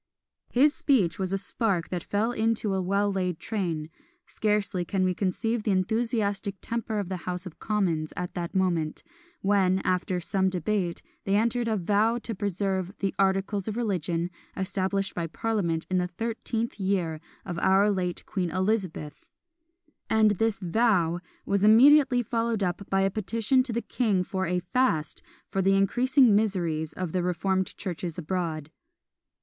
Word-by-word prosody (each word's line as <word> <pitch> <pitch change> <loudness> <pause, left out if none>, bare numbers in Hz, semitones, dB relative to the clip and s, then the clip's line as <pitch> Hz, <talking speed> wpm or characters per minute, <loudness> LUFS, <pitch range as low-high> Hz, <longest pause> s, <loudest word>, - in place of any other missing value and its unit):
His 285 +4 +4
speech 210 - +1
was 190 -1 -1
a 195 - +1
spark 195 -3 0
that 180 -2 -3
fell 215 +3 0
into 225 -3 0
a 190 - 0
well 200 +2 +1
laid 180 -3 -1
train; 170 -5 -3 0.3
scarcely 210 -4 0
can 185 +2 -1
we 185 0 +2
conceive 220 +5 -1
the 210 - -2
enthusiastic 205 0 0
temper 230 -2 -3
of 200 -3 -2
the 185 0 -3
House 180 +1 -3
of 180 - -10
Commons 175 -8 0
at 180 0 -4
that 175 +2 -4
moment, 170 -5 0 0.4
when, 195 -2 +3
after 185 0 0
some 190 +2 +1
debate, 185 0 -1 0.2
they 195 - +1
entered 235 +2 +1
into 225 - +1
a - - 0
vow 215 +4 +3
to 230 -1 -5
preserve 195 -1 -2
"the 195 -1 -1
articles 195 +1 +1
of 215 +1 -3
religion 175 -6 -1 0.3
established 195 +1 -1
by 170 -1 -2
parliament 170 -4 -1
in 185 0 +1
the 180 - 0
thirteenth 225 +3 -3
year 185 -5 0 0.3
of 175 -2 -4
our 195 +3 +4
late 180 -3 -2
Queen 185 -4 -2
Elizabeth!" 185 -5 -2 0.8
and 220 -1 +4
this 220 +1 0
vow 180 -3 +2 0.3
was 200 0 +1
immediately 250 +3 +6
followed 230 -2 -1
up 180 +2 -3
by 195 0 +2
a 195 0 +2
petition 225 +5 +1
to 255 -1 -3
the 235 +1 -2
king 210 -7 +1
for 190 -1 -2
a 180 +1 0
fast 175 - 0 0.3
for 195 - 0
the 195 +1 +3
increasing 245 +4 +4
miseries 170 -7 0
of 180 -3 -4
the 185 - 0
reformed 185 +2 -1
churches 175 -4 -4
abroad. 165 -3 -3
195 Hz, 160 wpm, -27 LUFS, 180-220 Hz, 0.8 s, immediately